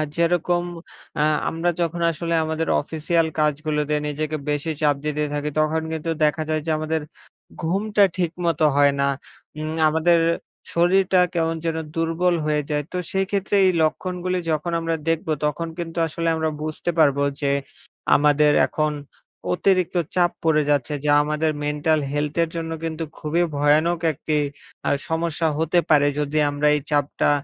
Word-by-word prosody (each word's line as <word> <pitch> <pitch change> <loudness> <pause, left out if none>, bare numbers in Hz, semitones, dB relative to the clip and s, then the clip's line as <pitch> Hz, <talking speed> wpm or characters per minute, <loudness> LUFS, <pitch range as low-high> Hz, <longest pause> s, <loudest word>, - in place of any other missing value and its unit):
যেরকম 175 +1 +1 0.6
আ - - +4 0.3
আমরা 165 +2 -1
যখন 170 0 -1
আসলে 170 +1 -3
আমাদের 160 +1 -2
অফিসিয়াল 160 +2 0
কাজগুলোতে 150 0 0
নিজেকে 155 +1 -3
বেশি 145 +2 -1
চাপ 145 -1 +3
দিতে 150 0 -1
থাকি 150 0 -2
তখন 155 +1 +1
কিন্তু 160 +1 -3
দেখা 150 +1 +2
যায় 155 0 0
যে, 160 - 0
আমাদের 155 +1 -1 0.6
ঘুমটা 200 +5 +1
ঠিকমতো 170 -2 0
হয় 145 0 +5
না। 140 - +2 0.5
উম 155 0 -3 0.2
আমাদের 160 +2 +3 0.6
শরীরটা 185 +2 +3
কেমন 165 -1 0
যেন 165 -1 -1 0.2
দুর্বল 165 +2 +1
হয়ে 150 -1 +1
যায়। 150 -1 0
তো 180 - -3
সেই 195 0 +1
ক্ষেত্রে 200 0 0
এই 185 - +5
লক্ষণগুলি 180 +3 -1
যখন 155 +3 -1
আমরা 165 0 -1
দেখব 165 0 -1 0.2
তখন 150 +3 -1
কিন্তু 170 -1 -6
আসলে 165 +2 -3
আমরা 160 0 0
বুঝতে 155 +2 -3
পারবো 140 -2 +4 0.2
যে, 140 -1 +1 0.6
আমাদের 150 +1 +4 0.2
এখন 155 0 0 0.6
অতিরিক্ত 185 0 +1 0.2
চাপ 175 -1 +3
পড়ে 160 -2 +3
যাচ্ছে 145 0 +1
যা 145 - +4
আমাদের 150 +1 0
মেন্টাল 150 +1 +1
হেলথ 145 0 -2
এর 165 - -3
জন্য 165 -1 -3
কিন্তু 165 0 -3
খুবই 165 +3 0
ভয়ানক 155 +4 +3
একটি 150 +2 -2 0.5
আ - - +3 0.2
সমস্যা 160 0 0
হতে 165 +2 +2
পারে 145 -2 +5
যদি 150 +1 0
আমরা 145 +1 0
এই 150 - -1
চাপটা 145 -1 +1
160 Hz, 155 wpm, -22 LUFS, 150-170 Hz, 0.6 s, হয়